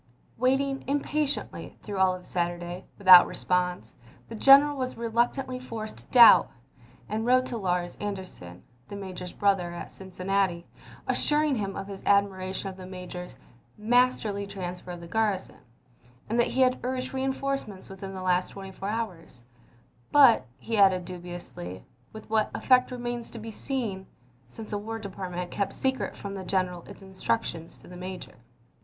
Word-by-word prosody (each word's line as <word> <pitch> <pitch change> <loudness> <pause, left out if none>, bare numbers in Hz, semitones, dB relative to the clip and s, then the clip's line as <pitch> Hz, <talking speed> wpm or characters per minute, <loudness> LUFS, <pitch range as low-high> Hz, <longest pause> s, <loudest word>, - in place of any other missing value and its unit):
Waiting 270 +2 +1
impatiently, 290 +1 -2
through 205 -2 -4
all 185 -1 +4
of 180 - -12
Saturday, 175 +1 -3
without 185 -3 +9
response, 180 -10 -1 0.4
the - - -7
general 275 +5 +7
was 255 -2 -4
reluctantly 240 +3 0
forced 225 -4 -7
to - - -16
doubt, 235 -3 +8 0.6
and 215 +2 -2
wrote 255 +2 +4
to 245 - -5
Larz 180 -4 -2
Anderson, 185 - -7 0.2
the 200 - -8
major's 185 -2 -7
brother, 195 -4 +1
at - - -7
Cincinnati, 190 -1 -2 0.4
assuring 300 -1 +2
him 200 -5 -2
of - - -5
his 195 -1 -8
admiration 195 -1 +1
of 190 -1 -7
the 185 -1 -9
major's 180 -4 -8 0.4
"masterly 220 -3 +1
transfer 180 -2 -6
of 175 -1 -6
the 170 - -9
garrison," 210 -1 -1 0.4
— 120 +1 -30
that 235 +2 +2
he 265 - 0
had 255 0 +3
urged 255 +1 -3
reinforcements 265 -6 -3
within 195 0 -8
the 185 - -6
last 180 0 +2
twenty 195 -1 -9
four 195 +1 -5
hours 180 - -5 0.3
— 120 0 -34
but, 245 - +6
he 225 -2 -2
added 185 -2 +5
dubiously, 175 - -8
" 125 - -36
with 220 0 -11
what 220 -1 +1
effect 255 -1 +4
remains 240 -2 -4
to - - -10
be 225 0 -7
seen," 215 -6 -4 0.2
— 125 0 -33
since 215 - -10
the 205 - -1
War 225 +2 -5
Department 185 -4 -5
had 175 - -6
kept 200 -1 -2
secret 265 -1 -2
from 200 -1 -6
the 195 -1 -6
general 180 -2 -1
its 200 -1 -12
instructions 190 -3 -3
to - - -17
the 180 - -11
major. 185 0 -7
195 Hz, 165 wpm, -27 LUFS, 180-235 Hz, 0.6 s, without